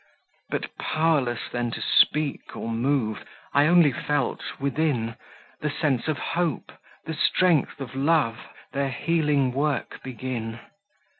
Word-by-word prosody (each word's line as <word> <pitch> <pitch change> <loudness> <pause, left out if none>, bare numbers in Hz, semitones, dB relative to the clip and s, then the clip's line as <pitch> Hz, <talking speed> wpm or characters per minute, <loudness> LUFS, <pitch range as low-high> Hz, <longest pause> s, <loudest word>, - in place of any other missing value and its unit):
But - - -3
pow'rless 155 -7 +1
then 120 -1 -1
to - - -5
speak 150 -2 +2
or 115 - -4
move, 115 -2 0 0.3
I 145 +1 +5
only 170 -3 +6
felt, 145 0 -1 0.2
within, 140 -5 0 0.4
The 150 - -1
sense 145 -4 0
of 155 -2 0
Hope, 170 -5 -2 0.3
the 160 - -3
strength 160 -1 +2
of 135 -3 -6
Love, 135 -4 +2 0.3
Their 140 0 0
healing 150 -1 +1
work 145 +2 -1
begin. 120 -3 -5
140 Hz, 125 wpm, -25 LUFS, 120-155 Hz, 0.4 s, only